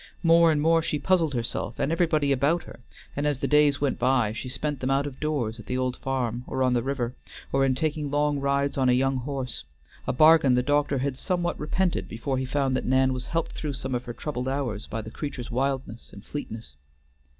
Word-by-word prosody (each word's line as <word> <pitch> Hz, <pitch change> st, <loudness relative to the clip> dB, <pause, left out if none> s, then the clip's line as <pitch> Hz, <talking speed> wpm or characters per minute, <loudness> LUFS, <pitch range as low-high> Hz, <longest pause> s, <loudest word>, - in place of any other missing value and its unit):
More 165 Hz, 0 st, +6 dB
and 150 Hz, -, +1 dB
more 165 Hz, +2 st, +4 dB
she 155 Hz, -1 st, -1 dB
puzzled 165 Hz, -2 st, +1 dB
herself 115 Hz, -1 st, -3 dB
and 145 Hz, -, 0 dB
everybody 160 Hz, -4 st, +2 dB
about 140 Hz, +6 st, +2 dB
her, -, -, -12 dB, 0.4 s
and 145 Hz, +1 st, 0 dB
as 145 Hz, -2 st, +1 dB
the -, -, -2 dB
days 150 Hz, -1 st, +4 dB
went 140 Hz, -2 st, 0 dB
by 125 Hz, -4 st, +2 dB
she 125 Hz, +3 st, -6 dB
spent 145 Hz, +2 st, -3 dB
them 130 Hz, -, -2 dB
out 135 Hz, +1 st, +2 dB
of 140 Hz, -2 st, -7 dB
doors 130 Hz, -8 st, -2 dB
at 110 Hz, -, -11 dB
the 125 Hz, -, -1 dB
old 130 Hz, -1 st, -1 dB
farm, 125 Hz, -3 st, -2 dB
or 130 Hz, -, -1 dB
on 130 Hz, -1 st, +3 dB
the 120 Hz, -, +2 dB
river, 125 Hz, -2 st, -2 dB, 0.4 s
or 135 Hz, 0 st, +3 dB
in 130 Hz, -1 st, +2 dB
taking 150 Hz, +1 st, -1 dB
long 145 Hz, 0 st, +1 dB
rides 140 Hz, 0 st, 0 dB
on 130 Hz, -1 st, +3 dB
a -, -, +5 dB
young 135 Hz, +1 st, +2 dB
horse; 130 Hz, -, -4 dB, 0.4 s
a -, -, +2 dB
bargain 155 Hz, -2 st, +6 dB
the 125 Hz, -, +2 dB
doctor 145 Hz, 0 st, +1 dB
had 135 Hz, 0 st, -2 dB
somewhat 175 Hz, -1 st, -1 dB
repented 175 Hz, +4 st, -1 dB
before 130 Hz, +4 st, -2 dB
he 130 Hz, -, -2 dB
found 135 Hz, 0 st, 0 dB
that -, -, -2 dB
Nan 130 Hz, +1 st, +3 dB
was 125 Hz, -1 st, -5 dB
helped 165 Hz, +1 st, -1 dB
through 150 Hz, -2 st, -4 dB
some 130 Hz, -1 st, -4 dB
of 125 Hz, 0 st, -2 dB
her 120 Hz, -, -5 dB
troubled 125 Hz, -1 st, -4 dB
hours 130 Hz, -6 st, -2 dB
by 110 Hz, 0 st, -4 dB
the 110 Hz, -, -9 dB
creature's 130 Hz, -4 st, -6 dB
wildness 130 Hz, -2 st, -2 dB
and 100 Hz, -, -13 dB
fleetness. 115 Hz, -, -7 dB
135 Hz, 225 wpm, -26 LUFS, 125-150 Hz, 0.4 s, More